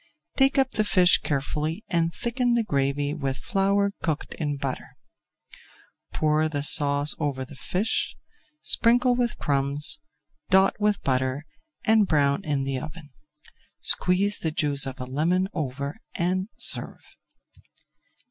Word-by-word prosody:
Take 270 Hz, +1 st, +3 dB
up 265 Hz, -1 st, +3 dB
the 215 Hz, -, 0 dB
fish 185 Hz, -3 st, +4 dB
carefully 150 Hz, +6 st, -3 dB
and 165 Hz, -2 st, 0 dB
thicken 240 Hz, +4 st, -1 dB
the 235 Hz, -, +1 dB
gravy 145 Hz, -3 st, -1 dB
with 135 Hz, -4 st, -3 dB
flour 200 Hz, -1 st, 0 dB
cooked 155 Hz, -3 st, -3 dB
in 145 Hz, -3 st, -2 dB
butter. 135 Hz, -1 st, -6 dB, 1.1 s
Pour 155 Hz, 0 st, +1 dB
the 145 Hz, -2 st, -3 dB
sauce 145 Hz, 0 st, +4 dB
over 140 Hz, -4 st, -2 dB
the 145 Hz, -, -14 dB
fish, 185 Hz, -, -2 dB, 0.5 s
sprinkle 245 Hz, +2 st, +3 dB
with 240 Hz, -2 st, -1 dB
crumbs, 140 Hz, 0 st, +1 dB, 0.5 s
dot 190 Hz, +1 st, +4 dB
with 210 Hz, -1 st, 0 dB
butter, 130 Hz, +2 st, -1 dB, 0.4 s
and 220 Hz, -2 st, +4 dB
brown 140 Hz, -3 st, +1 dB
in 145 Hz, -3 st, -1 dB
the 135 Hz, -1 st, -2 dB
oven. 155 Hz, +2 st, -10 dB, 0.7 s
Squeeze 195 Hz, +3 st, +1 dB
the 160 Hz, -, -1 dB
juice 145 Hz, -3 st, 0 dB
of 135 Hz, -, -7 dB
a 125 Hz, -, -4 dB
lemon 165 Hz, +8 st, 0 dB
over 140 Hz, -, -4 dB, 0.2 s
and 185 Hz, +3 st, -1 dB
serve. -, -, +1 dB
155 Hz, 130 wpm, -25 LUFS, 140-200 Hz, 1.1 s, fish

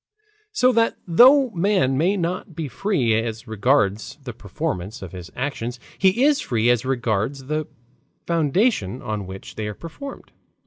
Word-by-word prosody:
So 255 Hz, -12 st, +3 dB
that 230 Hz, -1 st, +2 dB
though 255 Hz, -, +6 dB
man 185 Hz, -7 st, +1 dB
may 180 Hz, +9 st, +2 dB
not 175 Hz, -1 st, -3 dB
be 160 Hz, -2 st, -3 dB
free 140 Hz, -, 0 dB
as 115 Hz, 0 st, -5 dB
regards 110 Hz, -1 st, +1 dB
the 125 Hz, -3 st, -6 dB
performance 105 Hz, -, -5 dB
of 95 Hz, -, -8 dB
his 90 Hz, -2 st, -9 dB
actions, 125 Hz, -2 st, -3 dB, 0.2 s
he 190 Hz, +6 st, +3 dB
is 290 Hz, 0 st, +4 dB
free 120 Hz, 0 st, +2 dB
as 120 Hz, 0 st, +1 dB
regards 125 Hz, 0 st, -1 dB
the 155 Hz, +3 st, -2 dB, 0.6 s
foundation 165 Hz, -, +1 dB
on 105 Hz, -3 st, -4 dB
which 95 Hz, +1 st, -9 dB
they 110 Hz, -1 st, -4 dB
are 105 Hz, -, -5 dB
performed. 220 Hz, -, -9 dB
135 Hz, 150 wpm, -22 LUFS, 110-185 Hz, 0.6 s, though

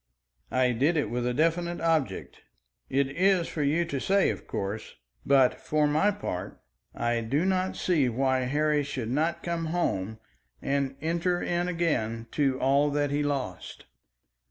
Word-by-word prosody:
"I 130 Hz, -1 st, +2 dB
did 140 Hz, +8 st, +1 dB
it 150 Hz, -, -1 dB
with 120 Hz, 0 st, -1 dB
a 125 Hz, -, 0 dB
definite 170 Hz, +3 st, +1 dB
object. 155 Hz, -, -1 dB, 0.5 s
It 140 Hz, +1 st, +2 dB
is 180 Hz, +2 st, +2 dB
for 155 Hz, -, -4 dB
you 155 Hz, +4 st, +2 dB
to 140 Hz, -5 st, -3 dB
say, 195 Hz, +7 st, +2 dB
of -, -, -8 dB
course, 100 Hz, +2 st, -4 dB, 0.3 s
but 135 Hz, -2 st, +4 dB
for 150 Hz, 0 st, +1 dB
my 155 Hz, +7 st, +3 dB
part 100 Hz, -, -5 dB, 0.4 s
I 120 Hz, 0 st, 0 dB
do 140 Hz, +9 st, 0 dB
not 190 Hz, 0 st, 0 dB
see 155 Hz, -8 st, +1 dB
why 130 Hz, +2 st, +1 dB
Harry 150 Hz, +3 st, +1 dB
should 130 Hz, -5 st, -4 dB
not 160 Hz, +5 st, 0 dB
come 170 Hz, -1 st, -2 dB
home 110 Hz, -, -1 dB, 0.4 s
and 140 Hz, -, -1 dB
enter 170 Hz, +2 st, 0 dB
in 175 Hz, 0 st, 0 dB
again 120 Hz, -11 st, -1 dB
to 135 Hz, -3 st, +1 dB
all 140 Hz, +2 st, +3 dB
that 145 Hz, 0 st, 0 dB
he 145 Hz, +1 st, 0 dB
lost." 135 Hz, -11 st, -4 dB
145 Hz, 155 wpm, -27 LUFS, 130-170 Hz, 0.5 s, but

